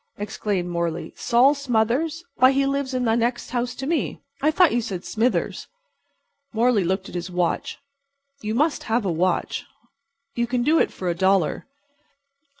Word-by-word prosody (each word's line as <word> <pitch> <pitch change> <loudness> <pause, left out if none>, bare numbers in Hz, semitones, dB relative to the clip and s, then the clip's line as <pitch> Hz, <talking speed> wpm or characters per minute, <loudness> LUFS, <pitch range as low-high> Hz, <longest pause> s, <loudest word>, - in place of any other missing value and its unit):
'" - - -54
exclaimed 205 -3 -2
Morley. 170 -1 -3
"Sol 250 +4 +4
Smothers? 280 +5 0
Why, 260 +1 +6
he 275 0 +2
lives 275 -1 -1
in 250 -1 0
the 225 - +3
next 235 +1 -1
house 245 0 -2
to 265 - -5
me. 315 0 -1 0.2
I 300 - +4
thought 340 +2 +4
you 240 - +2
said 190 -6 -5
'Smithers.'" 235 +3 -1 0.9
Morley 230 -2 +3
looked 190 +2 -1
at - - -11
his 175 +1 -4
watch. 175 -1 -1 0.6
You 215 -1 -2
must 300 +4 +1
have 225 -1 0
a 185 - +1
watch. 180 +3 0 0.7
You 235 0 -1
can 245 0 0
do 315 +5 +4
it - - +2
for 185 - -6
a 175 - +2
dollar. 190 -2 +1
235 Hz, 170 wpm, -23 LUFS, 190-265 Hz, 0.9 s, Why